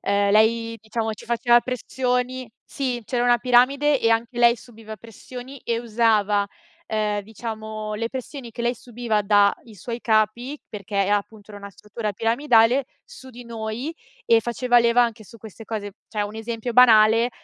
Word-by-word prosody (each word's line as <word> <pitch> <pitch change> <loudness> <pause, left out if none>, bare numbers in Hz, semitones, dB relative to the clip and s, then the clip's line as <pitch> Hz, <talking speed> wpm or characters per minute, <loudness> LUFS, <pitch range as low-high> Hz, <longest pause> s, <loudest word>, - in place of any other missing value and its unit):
ehm, 200 0 +1
lei, 230 +1 +2
diciamo 220 0 -3
ci 210 - -11
faceva 240 0 +3
pressioni 250 0 -2
sì, 250 -3 -3
c'era 245 +2 -1
una 240 0 +4
piramide, 265 +4 +3
e 230 - +2
anche 230 +2 0
lei 235 0 +5
subiva 220 -2 -12
pressioni, 245 +5 -11
e 235 0 -1
usava, 215 -3 +1 0.4
ehm, 210 -1 -1
diciamo, 215 0 -6
le 230 +2 -3
pressioni 260 0 -7
che 235 - -6
lei 240 +1 0
subiva 230 -3 -2
da 205 0 +4
i 225 - -15
suoi 230 +5 -6
capi, 225 +5 0
perché 200 -1 -2
è - - -3
appunto, 205 +1 -2
era 205 - -9
una 200 0 -10
struttura 210 +2 -6
piramidale, 230 +3 +3 0.2
su 260 - -13
di 245 0 -12
noi, 230 +5 -5 0.3
e 230 -1 +4
faceva 240 +1 +2
leva 235 +1 +4
anche 225 -2 -3
su 230 - -15
queste 220 +1 -12
cose. 205 -3 -5
Cioè, 210 -2 -3
1 205 +2 -6
esempio 230 +1 -4
banale, 230 -1 +6
230 Hz, 170 wpm, -23 LUFS, 215-245 Hz, 0.4 s, banale